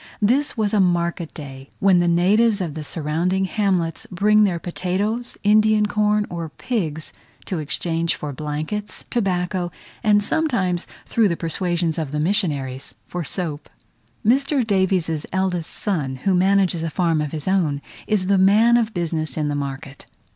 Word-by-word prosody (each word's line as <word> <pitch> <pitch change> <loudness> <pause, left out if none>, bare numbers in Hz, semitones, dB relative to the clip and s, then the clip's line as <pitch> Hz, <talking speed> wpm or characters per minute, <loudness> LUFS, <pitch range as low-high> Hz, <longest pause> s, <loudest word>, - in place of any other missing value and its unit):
This 255 +7 +1
was 215 -2 0
a 210 - +3
market 170 -2 +1
day, 135 -2 -9
when 190 -2 +4
the 175 - +2
natives 200 +6 +3
of 170 -5 -3
the 155 0 -6
surrounding 165 +5 -1
hamlets 185 -4 -1
bring 210 +3 +4
their 180 -4 0
potatoes, 190 +7 -2
Indian 215 0 +4
corn, 210 0 +1
or 170 -2 -5
pigs, 160 -6 -3 0.3
to 180 - -3
exchange 165 +2 0
for 145 -2 -5
blankets, 155 +9 -4
tobacco, 180 -5 -1 0.3
and 205 -2 +4
sometimes, 205 - 0 0.2
through 225 -2 +2
the 170 -3 -1
persuasions 170 0 -1
of 155 -4 -3
the 150 - -2
missionaries, 150 -8 -1
for 175 -1 -4
soap. 155 -3 -4 0.6
Mr. 275 +2 +2
Davies's 185 -6 +1
eldest 185 -3 -1
son, 150 -11 -2
who 195 - +2
manages 185 -2 +2
a 165 - -2
farm 165 -1 +1
of 150 -2 -3
his 155 0 -5
own, 170 -7 +1 0.3
is 210 -4 +1
the 195 0 +3
man 215 +5 +5
of 225 -3 -1
business 160 -4 -2
in 150 -1 0
the - - -1
market. 140 -1 -6
180 Hz, 155 wpm, -22 LUFS, 160-205 Hz, 0.6 s, man